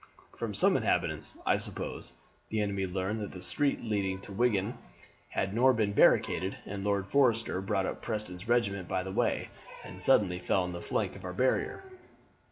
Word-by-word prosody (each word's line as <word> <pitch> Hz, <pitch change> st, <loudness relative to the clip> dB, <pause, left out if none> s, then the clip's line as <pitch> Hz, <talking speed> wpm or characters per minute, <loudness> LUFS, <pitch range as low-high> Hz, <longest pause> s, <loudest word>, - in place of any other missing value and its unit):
From -, -, -4 dB
some -, -, +4 dB
inhabitants, -, -, 0 dB
I -, -, +3 dB
suppose, -, -, -4 dB, 0.4 s
the 110 Hz, -, -1 dB
enemy 100 Hz, -2 st, -1 dB
learned 95 Hz, +4 st, -2 dB
that 105 Hz, -, -5 dB
the 95 Hz, -, -8 dB
street 140 Hz, +9 st, +1 dB
leading 100 Hz, -4 st, -1 dB
to -, -, -10 dB
Wigan 110 Hz, 0 st, +1 dB, 0.5 s
had 95 Hz, 0 st, -1 dB
nor 130 Hz, +4 st, +5 dB
been 105 Hz, -3 st, 0 dB
barricaded, 95 Hz, -1 st, +3 dB
and 100 Hz, 0 st, -5 dB
Lord 100 Hz, -1 st, +1 dB
Forrester 115 Hz, -4 st, +2 dB
brought 95 Hz, -1 st, 0 dB
up -, -, -4 dB
Preston's 105 Hz, -4 st, -4 dB
regiment 100 Hz, -6 st, +1 dB
by 95 Hz, -1 st, -1 dB
this 95 Hz, 0 st, -5 dB
way, -, -, 0 dB, 0.3 s
and 90 Hz, 0 st, -9 dB
suddenly 95 Hz, -7 st, +4 dB
fell 95 Hz, +1 st, +1 dB
on 90 Hz, -, -4 dB
the 85 Hz, 0 st, -6 dB
flank -, -, -1 dB
of 100 Hz, -, -11 dB
our 90 Hz, 0 st, -5 dB
barrier. 130 Hz, -, 0 dB
100 Hz, 175 wpm, -30 LUFS, 95-110 Hz, 0.5 s, nor